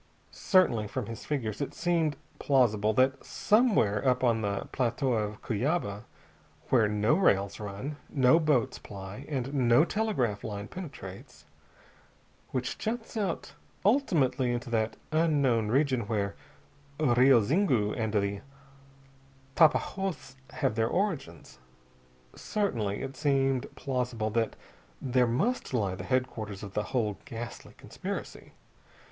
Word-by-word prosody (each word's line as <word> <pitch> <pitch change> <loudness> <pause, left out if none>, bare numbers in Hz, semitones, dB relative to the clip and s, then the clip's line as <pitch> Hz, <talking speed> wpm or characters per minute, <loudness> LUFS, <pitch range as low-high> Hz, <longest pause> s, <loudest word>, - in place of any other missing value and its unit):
Certainly, 125 - +2
from 125 +2 -4
his 115 +1 -8
figures, 115 -7 -2
it 140 - -4
seemed 165 -4 +1 0.2
plausible 110 -6 +3
that 130 +4 +2
somewhere 205 - +2
up 125 -1 +2
on 115 -3 +3
the 100 -2 -1
Plateau 125 +1 0
of 105 -1 -2
Cuyaba 110 - -1 0.6
where 115 -5 +4
no 105 +4 +2
rails 100 - +2
run, 105 +8 -5
no 135 +3 +4
boats 150 -7 +1
ply, 100 +6 -9
and 135 -2 -3
no 125 +2 +4
telegraph 165 - -1
line 100 -2 -5
penetrates; 135 - -9 1.0
which 125 -1 -3
juts 225 +1 -4
out 200 -6 -2 0.3
ultimately 160 - +2
into 120 0 -4
that 110 -1 0
unknown 145 -8 +2
region 130 -2 +1
where 100 -3 -1 0.6
the 150 -6 +2
Rio 125 +1 +6
Zingu 125 - +2
and 110 -2 -1
the 100 -1 0 1.1
Tapajoz 165 -2 +1 0.2
have - - 0
their 110 0 +1
origins 135 - -3 0.8
certainly 115 - -2
it 135 0 -6
seemed 135 -3 +1
plausible 125 -5 -2
that 115 0 0 0.4
there 125 -1 +2
must 135 - 0
lie 100 -6 0
the 95 - -7
headquarters 110 -6 -2
of 100 -1 -8
the 105 - -1
whole 110 -6 -1
ghastly 120 -2 -8
conspiracy. - - -7
125 Hz, 125 wpm, -29 LUFS, 105-145 Hz, 1.1 s, Rio